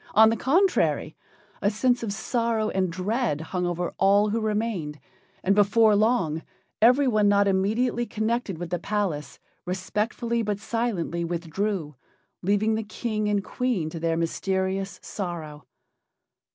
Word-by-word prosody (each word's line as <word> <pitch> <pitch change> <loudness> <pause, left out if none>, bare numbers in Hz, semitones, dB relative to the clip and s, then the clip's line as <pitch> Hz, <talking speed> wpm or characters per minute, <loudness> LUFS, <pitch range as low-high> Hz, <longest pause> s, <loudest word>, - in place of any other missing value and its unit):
On 220 +1 +7
the - - +1
contrary, 355 - +2 0.5
a 200 - +3
sense 245 +4 +1
of 225 -3 -3
sorrow 225 +1 -1
and 185 -2 0
dread 195 - -1
hung 180 +3 -2
over 175 0 -2
all 200 +2 +4
who 225 +2 -1
remained, 210 -9 -2 0.4
and 195 - +3
before 210 +2 +4
long 200 -8 +2 0.4
everyone 240 -3 +4
not 200 0 +4
immediately 225 +5 +1
connected 220 -3 -2
with 175 0 -6
the 175 - 0
palace 170 -10 -2 0.3
respectfully 210 +6 -2
but 210 -2 -1
silently 210 -6 -2
withdrew, 170 0 -2 0.5
leaving 205 +4 +2
the 220 - 0
King 215 0 -2
and 205 -1 +1
Queen 215 -12 -1
to 165 - -6
their 165 0 0
mysterious 190 +3 -1
sorrow. 155 - -6
205 Hz, 135 wpm, -25 LUFS, 175-225 Hz, 0.5 s, On